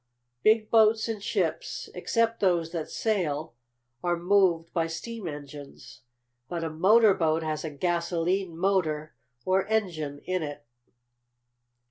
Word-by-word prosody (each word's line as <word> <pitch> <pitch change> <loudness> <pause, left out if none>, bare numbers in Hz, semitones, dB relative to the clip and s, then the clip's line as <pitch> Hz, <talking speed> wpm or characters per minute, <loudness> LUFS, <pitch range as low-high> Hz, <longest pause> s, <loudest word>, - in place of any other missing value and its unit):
"Big 215 0 +3
boats 220 0 +4
and 220 -3 -4
ships, - - -2
except 230 0 0
those 170 -4 +1
that 165 -3 -4
sail, 160 - -1 0.5
are 175 0 +1
moved 175 -2 +2
by 165 -2 +1
steam 195 +5 -6
engines. 145 -3 -9 0.5
But 170 -2 -3
a 160 - -3
motor 205 +6 +5
boat 160 -2 +1
has 155 -1 -3
a 160 - -3
gasolene 170 +3 -1
motor, 165 -5 0 0.3
or 190 +1 +2
engine, 170 -10 -1
in 185 0 -1
it." 145 -5 -6
175 Hz, 125 wpm, -27 LUFS, 160-200 Hz, 0.5 s, motor